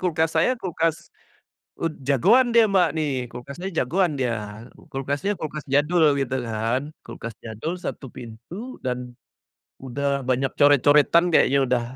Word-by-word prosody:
Kulkas 160 -3 +1
saya - - +4
kulkas, 165 -4 0 0.8
ud 165 -1 -1
jagoan 235 - +4
dia 230 -1 +6
Mbak 190 -2 +4
nih. 155 -2 0 0.2
Kulkasnya 140 +10 -7
jagoan 175 +7 +1
dia. 125 -3 0 0.6
Kulkasnya 140 +8 -2
kulkas 150 -1 -5
jadul, 160 +4 +3 0.2
gitu 130 -1 -1
kan? 115 +4 -1 0.2
Kulkas 115 -1 -7
jadul 115 +10 -4
1 - - -5
pintu, 115 +6 -10 0.3
dan 125 -1 -1 0.9
udah 140 +1 -2
banyak 130 +1 +1
coret-coretan 145 +3 +5
kayaknya 140 -3 +4
udah. 125 -1 +1
140 Hz, 130 wpm, -23 LUFS, 125-165 Hz, 0.9 s, dia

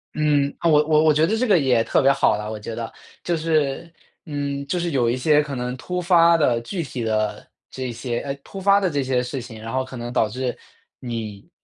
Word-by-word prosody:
嗯， 145 -2 +2
啊， 170 - +2
我 150 -1 +5
我 155 0 +4
我 155 - +5
觉 155 +2 +3
得 215 +6 0
这 255 +3 0
个 200 -5 +5
也 125 -6 +3
特 - - +1
别 135 0 +5
好 135 -6 +2
了， 105 0 -5
我 110 - -5
觉 110 +2 -6
得。 115 -1 -5 0.3
就 175 - 0
是， 160 0 -1 0.3
嗯， 140 -2 -3
就 180 - -1
是 170 -1 -2
有 120 -4 +2
一 125 - 0
些 150 +3 +4
可 145 -2 -5
能 125 0 -3
突 180 +8 -4
发 170 -1 +5
的、 125 -7 +2
具 170 +9 -4
体 125 -5 -5
的 110 -1 -1 0.3
这 130 -2 -4
些 120 0 -3
呃， 140 - -4
突 195 - -9
发 200 +1 +5
的 190 -2 +1
这 140 -2 0
些 130 -1 0
事 125 +1 -4
情， 115 -2 -10
然 115 +2 -7
后 130 0 0
可 130 0 -9
能 120 +1 -6
导 110 -3 +2
致 125 +2 -3 0.4
你， 110 -5 -6
135 Hz, 260 characters per minute, -22 LUFS, 120-160 Hz, 0.4 s, 我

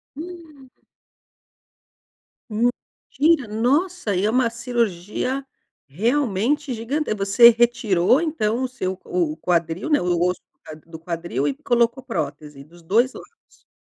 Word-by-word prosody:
Hum. 315 -5 -11 1.8
Mentira! 250 +5 0
Nossa, 255 - 0
e 190 +3 +1
é - - +2
uma 245 0 +2
cirurgia, 235 +2 -2 0.4
realmente, 245 - 0
gigante 240 +4 -2
você 200 +4 +6
retirou, 235 - +3
então, 255 -7 -1
o - - 0
seu 190 -7 -4
o 170 -4 -1
o - - -13
quadril, 170 - -1
né, 295 - +3
o 175 -1 0
osso 180 +1 0 0.3
d 155 - -14
do 160 -1 -9
quadril 165 -4 -3
e 140 - 0
colocou 240 - 0
prótese 145 - -5
dos 170 +3 -18
2 235 +10 +2
lados. 465 - -17
230 Hz, 125 wpm, -22 LUFS, 175-260 Hz, 1.8 s, você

